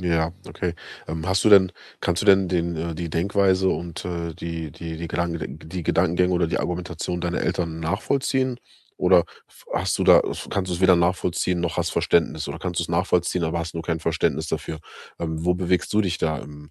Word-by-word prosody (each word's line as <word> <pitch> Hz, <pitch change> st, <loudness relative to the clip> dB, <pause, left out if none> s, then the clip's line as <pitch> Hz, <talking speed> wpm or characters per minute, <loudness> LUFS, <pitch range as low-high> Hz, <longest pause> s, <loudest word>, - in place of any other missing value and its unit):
Ja, 85 Hz, -2 st, +1 dB, 0.2 s
okay. 85 Hz, -1 st, -3 dB, 0.3 s
Ähm, 80 Hz, +1 st, -4 dB
hast 95 Hz, 0 st, +1 dB
du -, -, +6 dB
denn 95 Hz, -3 st, +7 dB, 0.3 s
kannst 85 Hz, -1 st, 0 dB
du -, -, -3 dB
denn 95 Hz, -1 st, +6 dB
den, 85 Hz, -1 st, 0 dB
äh 85 Hz, +1 st, -3 dB
die 85 Hz, 0 st, -4 dB
Denkweise 95 Hz, +2 st, +2 dB
und, 85 Hz, -2 st, -3 dB
äh, 85 Hz, -2 st, -3 dB
die 85 Hz, -2 st, -5 dB
die 80 Hz, +2 st, -7 dB
die 85 Hz, 0 st, -5 dB
Gedanked 85 Hz, -1 st, -2 dB, 0.3 s
die 90 Hz, -2 st, -3 dB
Gedankengänge 90 Hz, +2 st, +2 dB
oder 85 Hz, -1 st, +2 dB
die -, -, -1 dB
Argumentation 90 Hz, 0 st, -3 dB
deiner 90 Hz, 0 st, -1 dB
Eltern 80 Hz, -2 st, -2 dB
nachvollziehen? 130 Hz, -, 0 dB, 0.4 s
Oder 90 Hz, -2 st, +5 dB, 0.2 s
f -, -, -20 dB
hast -, -, 0 dB
du -, -, +1 dB
da -, -, +8 dB
s -, -, -4 dB
kannst 95 Hz, -2 st, -1 dB
du's 90 Hz, 0 st, -2 dB
weder 95 Hz, -1 st, +6 dB
nachvollziehen 90 Hz, 0 st, +1 dB
noch 85 Hz, -1 st, -2 dB
hast -, -, 0 dB
Verständnis? 80 Hz, -2 st, +1 dB
Oder -, -, -5 dB
kannst 90 Hz, -1 st, -3 dB
du's 85 Hz, -, -3 dB
nachvollziehen, 85 Hz, 0 st, +1 dB
aber 80 Hz, +1 st, 0 dB
hast 85 Hz, 0 st, -4 dB
nur 80 Hz, -, -3 dB
kein 80 Hz, 0 st, -1 dB
Verständnis 80 Hz, 0 st, 0 dB
dafür? 80 Hz, -, -3 dB, 0.4 s
Ähm, 80 Hz, -1 st, -3 dB
wo 90 Hz, -, +3 dB
bewegst 90 Hz, 0 st, 0 dB
du 105 Hz, -, +4 dB
dich 90 Hz, -4 st, 0 dB
da 80 Hz, -3 st, 0 dB
im 75 Hz, +1 st, -11 dB
85 Hz, 205 wpm, -24 LUFS, 80-90 Hz, 0.4 s, da